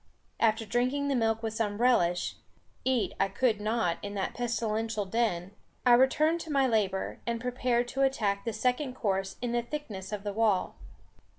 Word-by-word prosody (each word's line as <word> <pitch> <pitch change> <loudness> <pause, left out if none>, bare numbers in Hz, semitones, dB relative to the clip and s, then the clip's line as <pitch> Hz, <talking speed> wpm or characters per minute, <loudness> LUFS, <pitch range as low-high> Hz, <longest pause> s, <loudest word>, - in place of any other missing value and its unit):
After 225 0 +2
drinking 255 +6 0
the 275 - +1
milk 225 -1 +1
with 220 -1 -2
some 210 -2 -1
relish 180 -8 +2 0.5
eat 255 -3 +1
I 195 - +3
could 215 +2 +1
not 215 -5 0
in 205 0 -6
that 195 - -2
pestilential 225 -3 -1
den 190 -4 -1 0.3
I 245 - +7
returned 300 +6 +4
to 320 - -7
my 275 -2 +3
labour, 205 -6 0
and 235 0 -1
prepared 245 0 0
to 270 - -2
attack 210 -7 +1
the 230 - -2
second 255 +3 -1
course 195 -4 -1
in 245 - -1
the 240 0 +1
thickness 235 -8 -6
of 205 -1 -4
the 205 -1 -3
wall. 215 -3 +1
225 Hz, 175 wpm, -29 LUFS, 205-250 Hz, 0.5 s, I